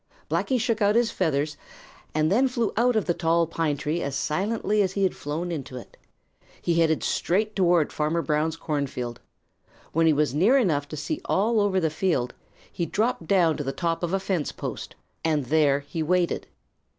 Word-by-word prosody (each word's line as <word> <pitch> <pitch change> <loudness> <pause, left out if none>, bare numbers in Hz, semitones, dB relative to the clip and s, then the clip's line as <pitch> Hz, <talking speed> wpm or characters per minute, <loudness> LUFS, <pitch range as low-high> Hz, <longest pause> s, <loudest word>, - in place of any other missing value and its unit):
Blacky 260 -2 +1
shook 225 0 0
out 205 +1 +3
his 235 -1 +3
feathers 145 -1 -1 0.6
and 155 +1 +2
then 250 +7 +4
flew 240 -4 -1
out 245 +2 +3
of 215 - +1
the 175 - +1
tall 170 0 +2
pine 160 -3 -1
tree 155 +4 -2
as 140 -1 -3
silently 205 +7 0
as 190 -2 0
he 200 - 0
had 190 - +1
flown 160 +5 -4
into 135 -5 -5
it. 125 - -11 0.6
He 170 -1 +1
headed 160 -1 +2
straight 210 +4 0
toward 175 -5 +3
Farmer 155 +2 0
Brown's 155 +2 0
cornfield. 140 -7 -3 0.7
When 165 +1 +3
he 160 - +5
was 150 -2 +1
near 200 - +4
enough 155 - +1
to 155 - -7
see 295 - -3
all 220 +4 +2
over 200 -2 +2
the 160 -3 0
field, 155 -7 0 0.4
he 170 - -3
dropped 215 -3 -1
down 175 -5 +3
to 145 - -3
the 135 - -2
top 165 +3 -2
of 175 -1 -2
a 195 - +1
fence 190 -5 -2
post, - - -6 0.3
and 155 -4 +1
there 145 0 +3
he 150 +3 -5
waited. 175 +2 0
165 Hz, 190 wpm, -25 LUFS, 150-195 Hz, 0.7 s, he